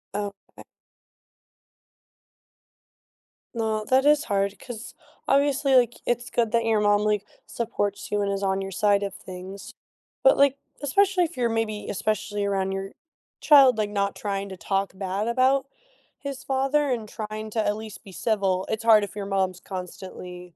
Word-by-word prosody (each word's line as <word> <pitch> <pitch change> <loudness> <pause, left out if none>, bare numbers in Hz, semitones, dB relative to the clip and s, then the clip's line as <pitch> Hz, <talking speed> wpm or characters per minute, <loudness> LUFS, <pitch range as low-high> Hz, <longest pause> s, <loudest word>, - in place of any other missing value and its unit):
Okay. 205 -1 -6 2.9
No, 220 -1 -1
that 260 +4 +3
is 295 0 +5
hard 200 -1 0
'cause, 240 -3 -9 0.3
obviously, 275 0 +3
like, 240 -2 +3
it's 240 +2 -1
good 230 -2 +1
that 230 0 +2
your 220 -2 +3
mom, 205 0 +3
like, 210 -1 +1 0.2
supports 205 -3 -3
you 205 - +1
and 200 0 0
is 195 - -2
on 195 0 0
your 195 - -5
side 205 +1 +2
of 200 -1 -3
things, 190 +1 -9 0.5
but, - - +6
like, 280 -1 +4 0.2
especially 375 +5 +3
if 310 - -9
you're 240 -2 +1
maybe 225 -2 -2
especially 205 0 -2
around 195 -1 0
your 195 0 -4 0.5
child, 275 -5 +7
like, 210 -1 0
not 200 -1 0
trying 200 -1 -3
to 190 - -8
talk 195 0 -1
bad 195 +2 -2
about 260 +3 +2 0.5
his 280 -2 -6
father 275 +2 +1
and 230 -4 -2
trying 215 0 -6
to 220 0 0
at 205 - +1
least 220 -2 -9
be 195 - -12
civil, 190 0 0
it's 220 +1 -2
hard 220 -2 +6
if 205 - -6
your 205 -1 -4
mom's 190 -2 0
constantly 180 -2 -8
210 Hz, 160 wpm, -25 LUFS, 195-245 Hz, 2.9 s, child